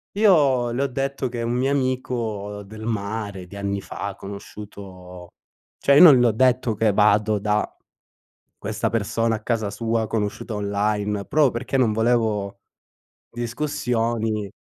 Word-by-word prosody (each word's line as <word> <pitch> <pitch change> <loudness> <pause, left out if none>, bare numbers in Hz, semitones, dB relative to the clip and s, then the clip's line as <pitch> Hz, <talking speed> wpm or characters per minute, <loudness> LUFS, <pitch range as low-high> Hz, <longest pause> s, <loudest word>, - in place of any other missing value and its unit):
io 145 - +4
le 125 +4 -1
ho - - +1
detto 135 0 -2
che 120 -1 -4
un 115 - -1
mio 130 +2 +1
amico 115 -6 -2
del 110 +2 -9
mare 100 -3 -4
di 95 - -13
anni 100 0 -3
fa, 100 -1 -6
conosciuto 95 -3 -10 0.5
cioè 140 - +4
io - - +8
non 145 -7 +9
le 120 - +4
ho 115 - +3
detto 125 0 +2
che 110 0 +2
vado 105 +1 +3
da 105 +1 0 0.9
questa - - -2
persona 115 +1 0
a 110 - -11
casa 110 -4 -1
sua, 115 0 -1
conosciuta 105 +1 -3
online, 105 0 -1
proprio 150 -3 +3
perché 120 +3 -3
non 120 -5 +3
volevo 110 -3 0 0.7
discussioni. 115 -4 -2
110 Hz, 145 wpm, -23 LUFS, 100-125 Hz, 0.9 s, non